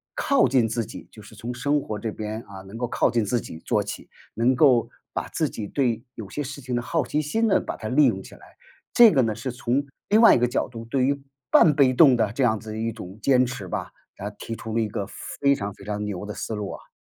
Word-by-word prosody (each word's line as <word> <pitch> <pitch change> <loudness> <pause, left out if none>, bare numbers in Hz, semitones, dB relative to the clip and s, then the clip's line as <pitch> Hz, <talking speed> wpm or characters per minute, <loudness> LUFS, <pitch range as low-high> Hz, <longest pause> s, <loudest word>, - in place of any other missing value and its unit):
靠 280 - +3
近 125 -2 +3
自 115 0 -2
己， - - -10
就 110 - -13
是 110 - -14
从 115 +4 -5
生 145 +4 +1
活 110 -6 -5
这 110 +1 -3
边， 110 +1 -5
啊， 95 -1 -10
能 95 +4 -10
够 120 0 -2
靠 - - +2
近 115 -2 +1
自 120 +4 0
己 80 - -9
做 - - 0
起， - - -7 0.2
能 120 +3 +2
够 125 -3 +4 0.2
把 - - -3
自 - - -1
己 105 - -6
对 120 -2 0
有 105 -4 -8
些 145 - -4
事 145 +1 -7
情 125 -1 -3
的 120 - 0
好 155 +3 -1
奇 150 +5 0
心 220 +10 0
呢， - - +4
把 - - -5
它 - - -6
利 - - +4
用 - - -1
起 - - -13
来。 - - -19 0.4
这 235 -3 +8
个 135 - +4
呢， 110 -3 0
是 130 - -4
从 125 +3 -1 0.2
另 215 - +5
外 230 - +8
一 - - +2
个 125 - +3
角 120 - -1
度， 115 -2 -9
对 130 +2 +1
于 140 +1 0 0.3
半 155 - +6
被 135 -2 +4
动 135 -1 +7
的 110 -3 +1
这 135 - 0
样 110 -3 +2
子 110 0 -9
的 110 - -5
一 115 +1 -1
种 100 -4 -10
坚 130 +1 +4
持 120 -6 -6
吧， - - -4 0.3
那 100 - -4
提 115 +2 -7
出 110 0 -7
了 115 - +2
一 110 - 0
个 100 - -3 0.3
非 140 0 +4
常 100 -4 -4
非 100 - -15
常 105 0 -3
牛 100 -2 -4
的 105 - -6
思 110 - -5
路 105 -1 -4
啊。 - - -11
120 Hz, 290 characters per minute, -24 LUFS, 110-135 Hz, 0.4 s, 这